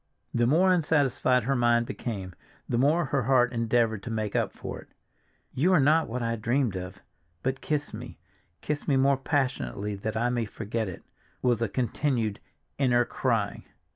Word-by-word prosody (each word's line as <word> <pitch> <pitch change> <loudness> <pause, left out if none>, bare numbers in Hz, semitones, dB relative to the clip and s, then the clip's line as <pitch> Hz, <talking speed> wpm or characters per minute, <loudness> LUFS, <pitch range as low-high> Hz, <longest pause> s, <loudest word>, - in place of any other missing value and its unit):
The 120 0 +2
more 180 +7 +4
unsatisfied 145 -6 +2
her 135 +4 +1
mind 120 -1 +3
became, 105 -7 -5 0.3
the 120 - 0
more 155 +6 +3
her 135 0 0
heart 125 0 +3
endeavored 115 -2 +1
to 115 - -7
make 110 -2 -2
up - - +1
for - - -7
it. - - -14 0.7
"You 165 +9 +2
are 180 - +6
not 155 +4 +4
what 120 +1 -3
I 115 0 -1
dreamed—but 100 -2 -3
kiss 150 -1 -2
me, - - -8 0.4
kiss 150 -1 -3
me 140 - +3
more 135 +1 +4
passionately 130 -7 -1
that 110 +2 -4
I 120 +2 +1
may 120 -2 0
forget 110 +1 -3
it!" 90 - -9 0.4
was 120 -3 +3
the 115 -3 0
continued 120 -2 -1 0.4
inner 120 -3 +3
cry. 115 -6 -1
120 Hz, 165 wpm, -27 LUFS, 110-135 Hz, 0.7 s, are